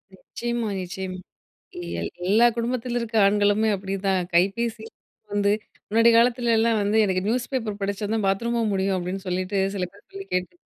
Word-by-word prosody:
நிச்சயமா, 235 +3 -4
நிச்சயமா, 185 +1 -5 0.8
எல் 85 - -3 0.2
எல்லா 220 +4 +5
குடும்பத்தில 240 +1 -2
இருக்கிற 225 -1 0
ஆண்களுமே 205 +2 +3
அப்பிடிதான். 195 -1 -1
கைபேசி 220 +6 +1 0.5
வந்து 205 0 +2 0.4
முன்னாடி 230 +2 +5
காலத்துலலாம் 230 -2 +3
வந்து 205 +2 +1
எனக்கு 185 -2 0
நியூஸ் 240 +2 -1
பேப்பர் 225 -6 -2
படிச்சா 200 +1 -2
தான் 220 -3 0
பாத்ரூமும் 230 +2 0
முடியும். 190 0 +1
அப்பிடின்னு 185 +2 -4
சொல்லிட்டு 185 +2 -1 0.2
சில 185 -2 -1
பேர் 200 - -21
சொல்லி 390 0 -8
கேட்டு. 180 - -1
205 Hz, 145 wpm, -24 LUFS, 190-235 Hz, 0.8 s, எல்லா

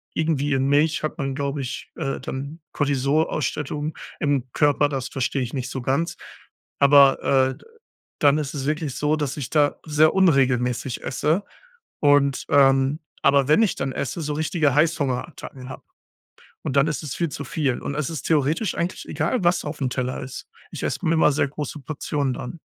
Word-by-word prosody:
irgendwie 150 -3 0
in 135 0 +1
Milch 150 +3 +2
hat 155 - -3
man 135 -1 -2
glaube 140 0 -2
ich, 130 0 -6
äh, 135 - -3
dann 140 +5 -6
Cortisolausschüttung 145 +1 -1 0.2
im 135 -4 0
Körper, 145 -1 +3
das 135 -2 -3
verstehe 135 0 -1
ich 125 +1 -4
nicht 130 -2 -3
so 130 - -4
ganz. 140 +7 -1 0.6
Aber 140 -1 +6 0.3
äh, - - -8
d - - -20 0.6
dann 145 0 +5
ist 150 -2 -3
es 135 -2 -4
wirklich 150 -2 -2
so, 150 +1 +1
dass 145 -2 -3
ich 140 - -4
da 145 -2 +2
sehr 155 0 +4
unregelmäßig 130 -8 +2
esse 155 +8 0 0.6
und 145 -2 +3
ähm 135 +1 +4 0.2
aber 140 -1 +4
wenn 155 +9 +5
ich 215 - +1
dann 135 -1 -2
esse, 140 +5 -3
so 150 0 -2
richtige 155 -2 +1
Heißhungerattacken 145 -3 -1
hab - - -9 0.8
und 135 - -3
dann 140 +1 +5
ist 150 -1 -2
es 150 -4 -5
viel 170 - 0
zu 145 - -6
viel 135 -2 -1
und 140 - -4
es 150 -1 -2
ist 160 -5 -5
theoretisch 155 +6 +1
eigentlich 175 +2 -3
egal, 165 +10 -1
was 175 0 +2
aufm 145 -4 -3
Teller 125 0 -3
ist. 130 - -8 0.2
Ich - - -7
esse - - -2
immer 160 -2 +3
sehr 140 0 +1
große 150 +1 -6
Portionen 145 -1 -2
dann. 125 +7 -7
145 Hz, 175 wpm, -23 LUFS, 135-155 Hz, 0.8 s, Aber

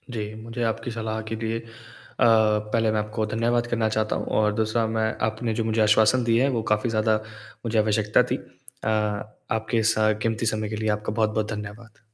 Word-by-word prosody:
जी, 105 -1 -4
मुझे 115 +2 -4
आपकी 115 +1 -2
सलाह 110 -1 -3
के - - -1
लिए 115 0 -2
अ, 115 - -14 0.6
पहले 110 0 +3
मैं 110 - +1
आपको 110 +1 -2
धन्यवाद 120 +2 0
करना 115 -2 0
चाहता 110 0 0
हूँ - - -3
और 105 -1 +2
दूसरा 110 +1 0
मैं 110 0 +2 0.2
आपने 110 +1 -2
जो - - +1
मुझे 110 0 +1
आश्वासन 110 +4 +4
दिए 115 +1 +3
हैं 140 - +3
वो - - 0
काफ़ी 105 +3 +2
ज़्यादा 110 -1 +2 0.5
मुझे 115 -1 0
आवश्यकता 105 0 +3
थी। - - +3
अ, - - -12 0.6
आपके 110 +1 0
स - - -7 0.3
कीमती 115 0 -1
समय 110 -1 -1
के 110 - -3
लिए 110 0 -1
आपका 105 0 -4
बहुत-बहुत 110 -1 0
धन्यवाद। 105 +2 -8
110 Hz, 195 wpm, -25 LUFS, 110-115 Hz, 0.6 s, आश्वासन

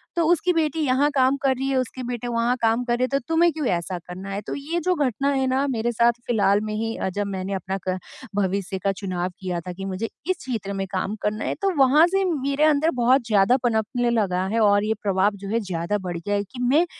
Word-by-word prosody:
तो 340 - +2
उसकी 350 +2 +3
बेटी 320 -2 0
यहाँ 280 0 +2
काम 260 0 +4
कर 270 -1 +2
रही 265 +1 -3
है, 270 - 0
उसके 255 0 -3
बेटे 245 -1 -4
वहाँ 235 +1 +1
काम 225 +2 +2
कर 240 -1 0
रहे 250 - 0
हैं 255 - +1
तो 275 - +1
तुम्हें 330 +1 +4
क्यों 310 -1 -3
ऐसा 175 +1 -1
करना 185 +2 -7
है? 195 0 -3
तो - - -6
ये 305 +5 -3
जो 365 - +3
घटना 265 +3 0
है 265 -1 +1
ना, 260 +2 +1
मेरे 240 -3 -1
साथ 235 +1 +4 0.2
फिलहाल 205 -3 +3
में - - -3
ही 225 +1 -2
अ, - - -2
जब 205 +2 -2
मैंने 190 +1 -3
अपना 190 0 -3
क 185 0 0 0.4
भविष्य 195 -1 -1
का 195 - +2
चुनाव 185 -2 -3
किया 180 -2 -3
था 180 - -6
कि 195 +2 -7
मुझे 195 +4 -3 0.2
इस 370 - +1
क्षेत्र 225 -8 -4
में 195 0 -2
काम 195 +2 -2
करना 215 +1 -1
है, - - -1
तो 395 - +2
वहाँ 280 +4 +6
से 390 +2 +1
मेरे 285 -4 0
अंदर 310 +1 +4
बहुत 250 +1 +4
ज़्यादा 210 +3 +4
पनपने 240 +1 +1
लगा 195 -6 +1
है 230 - +2
और 205 -2 +4
ये 215 +1 +1
प्रभाव 200 0 +2
जो 195 - -5
है 225 +2 +1
ज़्यादा 185 -1 -2
बढ़ 175 -1 -3
गया 205 +5 -2
है। 200 - 0
कि 205 +6 -12
मैं 285 +8 +4
230 Hz, 250 wpm, -23 LUFS, 195-270 Hz, 0.4 s, वहाँ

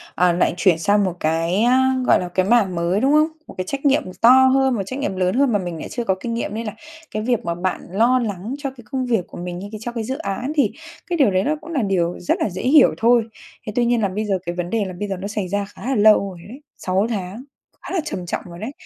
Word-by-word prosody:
ờ, 180 -1 +4
lại 175 - +1
chuyển 180 -3 +3
sang 205 +3 +3
một 185 - -1
cái, 165 +5 0
a, 260 +2 +4
gọi - - +5
là, 180 - -4
cái 185 +1 0
mảng 205 -5 +3
mới, 170 +4 0
đúng 270 +2 +3
không? 305 +1 +5 0.2
Một - - -10
cái 185 - -2
trách 275 +1 -4
nhiệm 280 +1 +3 0.2
to 230 - +7
hơn, 260 0 +5
một 205 - -1
trách 260 +7 -5
nhiệm 280 -9 -2
lớn 185 +1 0
hơn 275 -1 +3
mà 205 - +2
mình 175 -3 -5
lại - - -7
chưa 240 - -3
có 190 -4 +1
kinh 230 +3 -4
nghiệm 230 -3 -3
nên 225 +1 -4
là 210 - -4 0.4
cái 215 - -2
việc 240 -5 0
mà 170 0 -1
bạn 185 +1 -2
lo 235 +6 +3
lắng 215 +2 -4
cho 285 -1 -4
cái 245 -3 -15
công 260 -1 -1
việc 225 -7 0
của - - -11
mình 175 0 -5
như 200 - -7
cái 215 - -7
cho 240 - -4
cái 230 -2 -4
dự 260 +5 -3
án 255 -1 -3
thì 285 - +3 0.4
cái 345 -2 -1
điều 265 -9 +4
đấy 185 +1 +1
nó 305 - 0
cũng 335 +2 -9
là 280 -6 0
điều 180 -4 0
rất 175 - 0
là - - 0
dễ 185 +1 -6
hiểu 285 +5 +6
thôi, 235 +1 +4 0.4
thế 215 - -4
tuy 245 - +2
nhiên 240 -1 +2
là 200 - +2
bây 210 +3 -3
giờ 195 -3 0
cái 175 0 -3
vấn 175 -1 -3
đề 220 0 0
là 185 - -6
bây 205 - -2
giờ 195 - -3
nó 195 - -4
xảy 205 -2 -3
ra 200 +2 -1
khá 195 - -13
là 265 +1 0
lâu 210 +1 +6
rồi 180 -3 -11
ấy, 265 +5 -11 0.2
6 190 +3 0
tháng, 205 +2 -4 0.4
khá - - -7
là 365 - +1
trầm 180 -10 -4
trọng 170 - -3
rồi 170 0 -10
đấy, 230 +6 -5
210 Hz, 295 wpm, -21 LUFS, 185-255 Hz, 0.4 s, to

